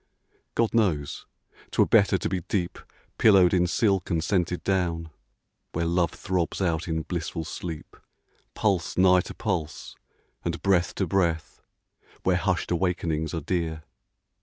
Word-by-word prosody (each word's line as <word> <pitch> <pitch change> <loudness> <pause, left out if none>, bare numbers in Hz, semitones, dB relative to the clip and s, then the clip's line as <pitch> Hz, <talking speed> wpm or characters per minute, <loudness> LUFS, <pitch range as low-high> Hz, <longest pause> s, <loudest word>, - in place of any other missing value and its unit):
God 115 -1 +1
knows 90 -11 0 0.4
't - - -7
were - - +7
better - - +4
to - - -2
be 95 0 -1
deep 90 0 -2 0.4
Pillowed 95 -5 +6
in 90 -1 +3
silk 95 0 +1
and 85 -3 0
scented 90 -1 0
down, 85 -4 -1 0.6
Where 85 +1 -1
Love 85 0 +2
throbs 90 -3 -2
out 85 -2 0
in 80 -1 -1
blissful 85 0 -4
sleep 80 0 -7 0.6
Pulse 95 -5 0
nigh 90 0 +6
to - - -9
pulse, 85 -9 -3 0.5
and 85 -1 -2
breath 90 -3 +2
to 95 - 0
breath, 85 -3 -1 0.6
Where 95 - +3
hushed 90 -2 -1
awakenings 85 -3 -1
are 80 - -2
dear 80 -1 -2
90 Hz, 140 wpm, -26 LUFS, 80-95 Hz, 0.6 s, were